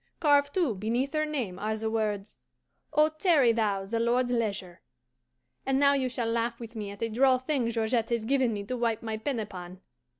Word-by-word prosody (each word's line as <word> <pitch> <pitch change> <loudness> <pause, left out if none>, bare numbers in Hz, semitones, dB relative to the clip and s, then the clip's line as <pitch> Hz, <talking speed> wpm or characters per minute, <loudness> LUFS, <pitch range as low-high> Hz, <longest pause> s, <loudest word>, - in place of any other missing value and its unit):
Carved, 285 -2 +3
too, 340 -11 +2
beneath 235 +8 -1
her 310 0 +1
name, 240 -12 -3
are 215 +1 -2
the 220 +1 -3
words, 215 -2 -2 0.5
"Oh, 305 +1 +4
tarry 310 -6 +3
thou 205 -4 0
the 230 +4 -2
Lord's 245 +2 +1
leisure." 200 -7 -2 0.8
And 270 0 +1
now 280 0 +5
you 265 -2 0
shall 245 -1 -2
laugh 230 +1 -1
with 230 0 -9
me 210 -2 -4
at 200 +2 -6
a - - +1
droll 255 +3 +3
thing 260 -2 -1
Georgette 230 0 0
has 235 -2 -1
given 260 -1 +2
me 205 -2 -3
to 250 +5 -4
wipe 230 -2 -1
my 220 -1 -3
pen 245 +2 -2
upon. 185 -3 -7
230 Hz, 200 wpm, -28 LUFS, 215-265 Hz, 0.8 s, now